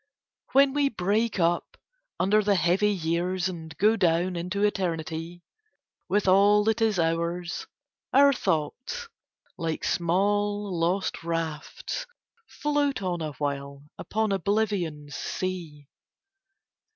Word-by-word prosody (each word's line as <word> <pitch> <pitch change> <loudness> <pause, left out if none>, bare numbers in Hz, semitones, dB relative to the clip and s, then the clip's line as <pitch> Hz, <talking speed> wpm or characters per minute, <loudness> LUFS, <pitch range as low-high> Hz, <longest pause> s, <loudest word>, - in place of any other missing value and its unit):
When 275 0 +5
we 285 -1 +2
break 210 0 0
up 170 0 0 0.4
under 210 +3 +4
the 205 -1 +2
heavy 180 +4 +3
years 180 0 0
and 160 -3 -7
go 215 +3 +4
down 180 -1 +1
into 180 +4 -2
eternity 170 -3 -2 0.7
with 205 0 +1
all 200 +2 +5
that 220 +1 +1
is 220 -3 +2
ours 170 - -1 0.4
our 280 +1 +6
thoughts 255 - -2 0.5
like 165 -1 -2
small 205 +3 +1
lost 175 +1 0
rafts 165 - -4 0.4
float 290 -6 -1
on 175 -2 -2
awhile 140 -2 -4 0.2
upon 220 -1 -1
Oblivion's 195 -7 -1
sea. 165 -6 -4
185 Hz, 105 wpm, -27 LUFS, 165-210 Hz, 0.7 s, our